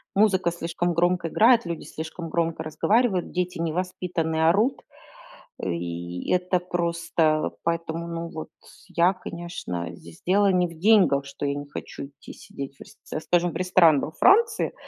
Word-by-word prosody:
музыка 190 Hz, -4 st, +3 dB
слишком 170 Hz, +1 st, -2 dB
громко 175 Hz, 0 st, +1 dB
играет, 230 Hz, +5 st, +4 dB
люди 170 Hz, -1 st, -4 dB
слишком 160 Hz, +1 st, -7 dB
громко 165 Hz, -1 st, -1 dB
разговаривают, 200 Hz, +4 st, +1 dB
дети 180 Hz, -1 st, -2 dB
невоспитанные, 165 Hz, -1 st, -1 dB
орут. 215 Hz, +9 st, +2 dB, 0.8 s
И 85 Hz, 0 st, -4 dB
это 180 Hz, 0 st, +1 dB
просто 170 Hz, -3 st, 0 dB
поэтому, 165 Hz, 0 st, -2 dB
ну 170 Hz, 0 st, -4 dB
вот 160 Hz, -1 st, -7 dB, 0.4 s
я, 175 Hz, +1 st, +3 dB
конечно, 170 Hz, -, -6 dB
здесь 85 Hz, -1 st, -15 dB
дело 200 Hz, +1 st, +4 dB
не 180 Hz, -1 st, +2 dB
в 170 Hz, -, -12 dB
деньгах, 185 Hz, -7 st, +4 dB
что 140 Hz, +1 st, -6 dB
я 140 Hz, -, 0 dB
не 145 Hz, 0 st, -5 dB
хочу 140 Hz, -, -7 dB
идти 140 Hz, -, -13 dB
сидеть 140 Hz, 0 st, -8 dB
в -, -, -21 dB
рест -, -, -14 dB
ц -, -, -5 dB
скажем, 175 Hz, 0 st, +1 dB
в -, -, -12 dB
ресторан 170 Hz, -4 st, +4 dB
во -, -, -4 dB
Франции, 430 Hz, -, +3 dB
170 Hz, 155 wpm, -25 LUFS, 155-180 Hz, 0.8 s, играет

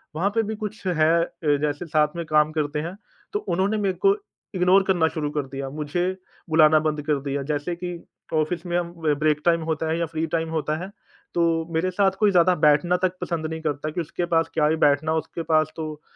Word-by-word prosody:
वहाँ 185 Hz, +6 st, +1 dB
पे 225 Hz, -, +4 dB
भी 215 Hz, +1 st, -4 dB
कुछ 215 Hz, -1 st, -7 dB
है 165 Hz, 0 st, +3 dB, 0.4 s
जैसे 150 Hz, +3 st, -2 dB
साथ 155 Hz, -1 st, +3 dB
में 170 Hz, -1 st, -4 dB
काम 155 Hz, 0 st, +3 dB
करते 150 Hz, -1 st, -1 dB
हैं 170 Hz, +4 st, -5 dB, 0.4 s
तो 415 Hz, -, +1 dB
उन्होंने 200 Hz, -, 0 dB
मेरे 195 Hz, -3 st, 0 dB
को 395 Hz, -, +6 dB, 0.4 s
इग्नोर 185 Hz, +2 st, +4 dB
करना 175 Hz, -4 st, +3 dB
शुरू 155 Hz, -3 st, -3 dB
कर 145 Hz, -, +1 dB
दिया। 135 Hz, 0 st, -4 dB
मुझे 150 Hz, +4 st, -3 dB, 0.5 s
बुलाना 155 Hz, -1 st, +6 dB
बंद 150 Hz, -1 st, -1 dB
कर 150 Hz, -2 st, +1 dB
दिया 140 Hz, 0 st, -2 dB
जैसे 150 Hz, +4 st, -2 dB
कि 175 Hz, 0 st, -5 dB, 0.4 s
ऑफ़िस 160 Hz, +3 st, 0 dB
में 175 Hz, 0 st, 0 dB
हम 170 Hz, -1 st, -2 dB
ब 150 Hz, -, +3 dB
ब्रेक 150 Hz, -1 st, +2 dB
टाइम 170 Hz, -1 st, +3 dB
होता 160 Hz, 0 st, -2 dB
है 160 Hz, -, 0 dB
या 170 Hz, -, +1 dB
फ्री 160 Hz, 0 st, -3 dB
टाइम 165 Hz, 0 st, -1 dB
होता 155 Hz, -1 st, -1 dB
है 190 Hz, -, -6 dB, 0.4 s
तो 170 Hz, -, +2 dB, 0.3 s
मेरे 180 Hz, +3 st, 0 dB
साथ 195 Hz, +1 st, +3 dB
कोई 210 Hz, -2 st, +4 dB
ज़्यादा 180 Hz, 0 st, +4 dB
बैठना 150 Hz, +5 st, +4 dB
तक 185 Hz, 0 st, -2 dB
पसंद 165 Hz, -3 st, -2 dB
नहीं 160 Hz, 0 st, -5 dB
करता 150 Hz, -1 st, -2 dB
कि 175 Hz, -, -2 dB
उसके 170 Hz, +2 st, -3 dB
पास 165 Hz, 0 st, +3 dB
क्या 150 Hz, -1 st, +3 dB
ही 160 Hz, -, +2 dB
बैठना 155 Hz, 0 st, +2 dB
उसके 160 Hz, +1 st, -3 dB
पास 155 Hz, -1 st, +2 dB
तो 155 Hz, -2 st, -6 dB
160 Hz, 220 wpm, -24 LUFS, 155-175 Hz, 0.5 s, को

